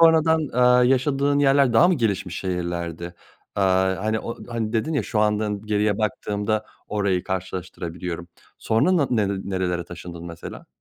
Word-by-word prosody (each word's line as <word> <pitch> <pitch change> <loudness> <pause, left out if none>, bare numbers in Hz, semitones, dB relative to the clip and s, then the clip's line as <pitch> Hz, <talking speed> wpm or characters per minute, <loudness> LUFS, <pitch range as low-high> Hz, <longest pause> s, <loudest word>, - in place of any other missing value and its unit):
sonradan, 160 -2 +5
aaa, 125 0 +5
yaşadığın 135 +2 +2
yerler 140 -2 +4
daha 165 +10 +6
mı 185 - +4
gelişmiş 100 - -1
şehirlerdi? 85 -2 -3 0.4
Aaa, 95 -1 +2
hani 110 0 +1
o, 115 - -5
hani 115 -2 -3
dedin 120 +8 0
ya 140 - +1
şu 105 - -2
anda 105 0 +2 0.2
geriye 105 -1 +1
baktığımda 105 0 -1 0.2
orayı 100 -4 0
karşılaştırabiliyorum 90 -2 -5 0.3
sonra 145 +12 +2
na 145 -5 +2
nere 100 -5 +1
nerelere 90 -3 -1
taşındın 85 -1 -9
mesela? 85 -1 -9
105 Hz, 145 wpm, -23 LUFS, 90-125 Hz, 0.4 s, daha